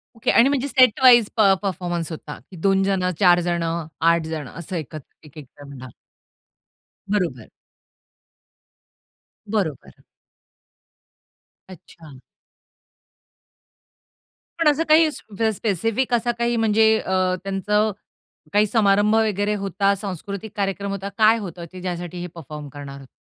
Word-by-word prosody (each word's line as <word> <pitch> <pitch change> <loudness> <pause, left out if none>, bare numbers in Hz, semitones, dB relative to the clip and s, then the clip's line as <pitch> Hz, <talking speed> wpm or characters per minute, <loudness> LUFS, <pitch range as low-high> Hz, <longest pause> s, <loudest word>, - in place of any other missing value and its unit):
Okay. 225 - 0
आणि 245 +4 +5
म्हणजे 280 -1 -1
setwise 250 -3 +5
प - - +4 0.2
परफॉर्मन्स 175 -3 -3
होता. 150 -1 -8 0.2
2 195 -1 +2
जणं, 185 -2 0
4 175 -2 +5
जणं, 165 -1 -2
8 165 0 +3
जणं 150 -5 -6
असं 175 +2 -7
एकत्र 155 -2 -8
एक-एक 150 -1 -12
जण. 140 0 -13
हां. 130 - -9 1.2
बरोबर. 170 - -2 2.0
बरोबर. 190 - -3 1.7
अच्छा. 160 -6 -14 2.4
पण 325 - +2
असं 315 +3 -1
काही 315 0 +6
स्प 220 -5 -7
स्पेसिफिक 225 +6 -1
असा 240 +1 +1
काही 235 0 0
म्हणजे 220 0 +3
अ, 185 -1 0
त्यांचा 210 +2 0 0.6
काही 210 +1 +4
समारंभ 205 0 +3
वगैरे 210 -2 +1
होता, 195 0 0
सांस्कृतिक 200 +1 -6
कार्यक्रम 200 0 -2
होता, 200 0 -5
काय 220 +1 +5
होतं, 175 -5 -7
की 185 -1 -10
ज्यासाठी 175 -1 -5
हे 180 - -5
परफॉर्म 150 -2 -9
करणार 140 0 -9
होते? 135 - -14
195 Hz, 120 wpm, -22 LUFS, 170-215 Hz, 2.4 s, काही